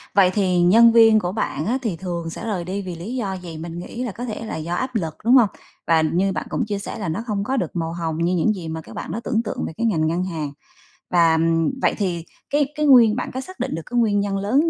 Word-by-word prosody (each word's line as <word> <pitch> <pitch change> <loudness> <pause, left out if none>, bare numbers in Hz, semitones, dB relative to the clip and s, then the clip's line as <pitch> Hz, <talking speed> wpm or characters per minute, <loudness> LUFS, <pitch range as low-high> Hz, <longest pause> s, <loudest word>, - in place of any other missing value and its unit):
Vậy 185 -2 +5
thì 185 -4 +2
nhân 230 +7 +7
viên 225 -1 +6
của 180 -3 -2
bạn 165 -7 -2
á, 250 +4 +1
thì 220 -8 -2
thường 170 -2 -4
sẽ 165 - -7
rời 200 -6 -2
đi 190 +3 -3
vì 180 -2 -6
lý 195 +10 -6
do 200 -6 -2
gì, 170 -3 -8
mình 165 +1 -6
nghĩ 240 +7 -6
là 240 - -3
có 240 +6 -6
thể 225 -1 -5
là - - -5
do 165 +2 -4
áp 255 +5 -3
lực, 165 -7 -1
đúng 240 - +5
hông? 230 -6 +6 0.4
Và 165 -1 +4
như 175 +5 +1
bạn - - -3
cũng 245 - -1
chia 205 -1 -3
sẻ 210 - -6
là 195 - -3
nó 195 +9 -3
hông 200 -2 -1
có 265 +5 -1
được 180 -8 -2
màu 165 -1 -2
hồng 165 -2 -3
như 175 +2 +1
những 195 +6 +2
gì 180 -5 -7
mà 160 0 -4
các - - -13
bạn - - -5
đó 215 - -3
tưởng 225 +1 0
tượng 210 - -4
về - - -7
cái 235 - -1
ngành 160 -7 +1
ngân 170 +3 0
hàng. 155 -6 -4 0.6
Và, 170 -2 +4
ừm, 165 +9 +1
vậy - - +2
thì 175 -5 -2 0.2
cái 290 -1 +1
cái 300 0 0
nguyên 240 -6 +7
bạn 250 - -3
có 260 - -3
xác 370 +6 -11
định - - -2
được 165 - -4
cái 245 -1 -1
nguyên 210 -3 +2
nhân 200 -1 -1
lớn 260 +12 +2
195 Hz, 285 wpm, -22 LUFS, 170-225 Hz, 0.6 s, nhân